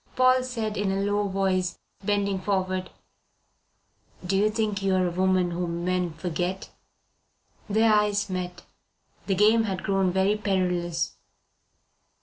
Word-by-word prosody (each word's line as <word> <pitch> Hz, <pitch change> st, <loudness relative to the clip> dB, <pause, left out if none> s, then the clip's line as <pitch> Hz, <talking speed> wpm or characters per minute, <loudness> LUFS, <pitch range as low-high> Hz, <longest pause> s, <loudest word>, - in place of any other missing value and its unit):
Paul 255 Hz, 0 st, +5 dB
said 225 Hz, -4 st, -3 dB
in 200 Hz, -1 st, 0 dB
a 195 Hz, 0 st, 0 dB
low 205 Hz, 0 st, 0 dB
voice, 190 Hz, -2 st, 0 dB, 0.3 s
bending 200 Hz, -1 st, 0 dB
forward: 185 Hz, -2 st, -1 dB, 1.4 s
"Do 190 Hz, +2 st, 0 dB
you 205 Hz, +2 st, +3 dB
think 215 Hz, -2 st, -1 dB
you 195 Hz, -1 st, +2 dB
are 185 Hz, -1 st, +2 dB
a 175 Hz, -, -1 dB
woman 185 Hz, 0 st, +2 dB
whom 170 Hz, 0 st, -3 dB
men 180 Hz, -2 st, 0 dB
forget?" 180 Hz, +3 st, -3 dB, 1.0 s
Their 220 Hz, +1 st, +4 dB
eyes 210 Hz, 0 st, +2 dB
met. 180 Hz, -1 st, -5 dB, 0.6 s
The 195 Hz, -, +1 dB
game 220 Hz, +3 st, +4 dB
had 190 Hz, -3 st, -3 dB
grown 195 Hz, -2 st, +1 dB
very 190 Hz, +3 st, +2 dB
perilous. 180 Hz, -4 st, -1 dB
195 Hz, 135 wpm, -26 LUFS, 185-205 Hz, 1.4 s, Paul